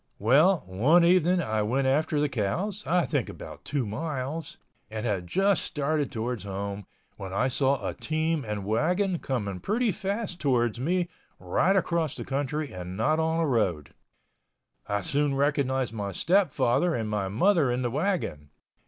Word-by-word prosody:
Well, 150 - +4
one 130 - +4
evening 180 0 +4
I 110 -3 0
went 130 +6 0
after 145 +3 +1
the 150 - +2
cows—I 175 - -1
think - - -1
about - - -10
two 140 -4 -1
miles—and 130 -3 -5
had 95 -6 -1
just 195 - +2
started 150 0 -1
towards 115 -3 -3
home, 100 0 -5 0.3
when 95 -1 -7
I 125 +7 +1
saw 130 -5 +1
a - - -2
team 155 -1 -1
and 105 -3 -4
wagon 175 - +1
coming 100 -8 -3
pretty 225 - +1
fast 195 0 -3
towards 120 -5 +1
me 175 +6 0 0.3
right 190 +2 +1
across 170 -5 0
the - - -6
country 145 +2 -2
and 90 0 -6
not 155 +8 +2
on 160 +1 +1
a - - +2
road. 95 - 0 0.9
I 100 0 0
soon 140 +7 0
recognized 135 -3 +1
my 100 -3 -4
stepfather 170 - +2
and 110 -2 -2
my 105 -2 -1
mother 145 - +3
in 125 +1 -1
the 120 - -1
wagon. 140 - -2
135 Hz, 155 wpm, -27 LUFS, 110-165 Hz, 0.9 s, Well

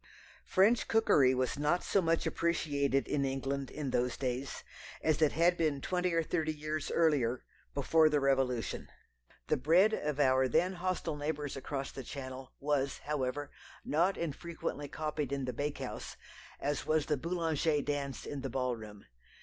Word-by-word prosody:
French 215 +5 +4
cookery 145 - +4
was 130 +2 -1
not 150 +5 +2
so 195 - +2
much 165 -1 +1
appreciated 140 -5 +1
in 140 - 0
England 135 0 -2
in 145 -4 -4
those 125 0 0
days 130 +1 -3 0.4
as 155 -1 +2
it 155 - +4
had 170 +2 +4
been 155 -4 +1
twenty 180 +4 0
or 165 0 +2
thirty 155 0 0
years 155 0 -3
earlier, 140 -7 +2 0.3
before 155 +3 +4
the 150 -1 +2
Revolution. 135 -4 0 0.6
The 155 - +1
bread 175 +10 +4
of 150 -7 -2
our 130 -1 +4
then 180 +9 +2
hostile 180 -3 -2
neighbours 145 -1 -3
across 135 0 -4
the 135 - -7
Channel 130 0 -7
was, 140 -1 0
however, 145 -1 -2 0.3
not 175 +6 +2
infrequently 165 -2 -4
copied 150 -2 -3
in 140 -1 -1
the 125 - -3
bakehouse, 145 +4 -4 0.4
as 145 0 -2
was 155 -1 +2
the 150 - +1
Boulanger 160 -1 0
dance 140 -3 -3
in 145 -2 -5
the 135 - -3
ball 125 -1 -1
room. 105 -2 -11
145 Hz, 160 wpm, -32 LUFS, 135-160 Hz, 0.6 s, French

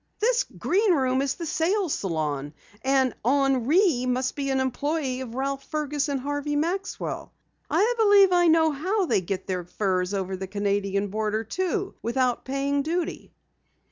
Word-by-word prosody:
"This - - +2
Green 395 0 +2
Room 260 -2 +1
is 275 -1 -1
the 340 - -6
sales 335 +3 0
salon, 150 -5 -2 0.3
and 265 -2 +2
Henri 270 - +3
must 255 +1 0
be 275 -1 -2
an 265 0 +1
employee 265 +1 -1
of 240 -2 -7
Ralph 275 +1 -2
Fergus 295 -1 -2
and 280 -1 -1
Harvey 290 +2 -2
Maxwell. 350 +6 -3 0.4
I 455 +4 +3
believe 405 -3 +6
I 350 -1 +4
know 320 -1 +4
how 370 +8 0
they 195 - +1
get 190 +1 -4
the 185 -2 -2
furs 185 +1 -1
over 190 -1 -2
the 190 +1 -6
Canadian 200 0 -1
border, 215 +1 -1
too, 375 - -2
without 245 +1 0
paying 275 +1 0
duty!" 335 +3 -3
275 Hz, 155 wpm, -25 LUFS, 215-330 Hz, 0.4 s, believe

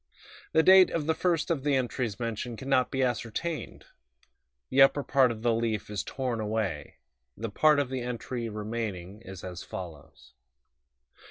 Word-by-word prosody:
The 160 - +5
date 190 +1 +8
of 165 -3 -2
the 160 - +2
first 170 0 0
of 145 -5 -1
the 145 -1 +2
entries 125 -4 -2
mentioned 115 0 -4
can 135 - -8
not 130 -2 +3
be 135 0 0
ascertained; 125 +6 -3 0.9
the 135 - +5
upper 140 +1 +5
part 135 -2 +4
of 115 -1 -6
the 120 -1 +3
leaf 110 -3 -2
is 105 - -2
torn 125 -4 -3
away; 105 -8 -3 0.4
the 115 0 -4
part 155 +7 +4
of 140 -3 0
the 130 -1 -2
entry 120 -1 -4
remaining 105 -3 -5
is 95 -5 -10
as 90 -1 -6
follows 80 -7 -10
120 Hz, 165 wpm, -28 LUFS, 105-135 Hz, 0.9 s, date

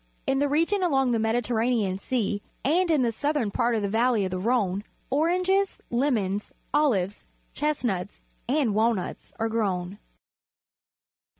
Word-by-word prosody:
In 270 - +1
the 285 0 +2
region 335 +7 +2
along 270 -8 +2
the 230 - +1
]Mediterranean 225 -3 +1
Sea, 210 -2 -1 0.2
and 345 +6 +3
in 300 -5 +3
the 235 - +2
southern 285 -2 -1
part 235 +3 +1
of 215 - -1
the - - +1
vallej 225 0 +2
of 185 - -3
the 185 - -2
Rhone, 200 -3 +1 0.3
oranges^ 365 +6 +2
lemons, 220 -6 0 0.2
olives, 205 -10 +1 0.3
chestnuts, 235 -11 -2 0.3
and 265 -5 +2
walnuts 220 -2 0
are 225 - 0
grown. 200 -4 -2
235 Hz, 135 wpm, -26 LUFS, 205-285 Hz, 0.3 s, and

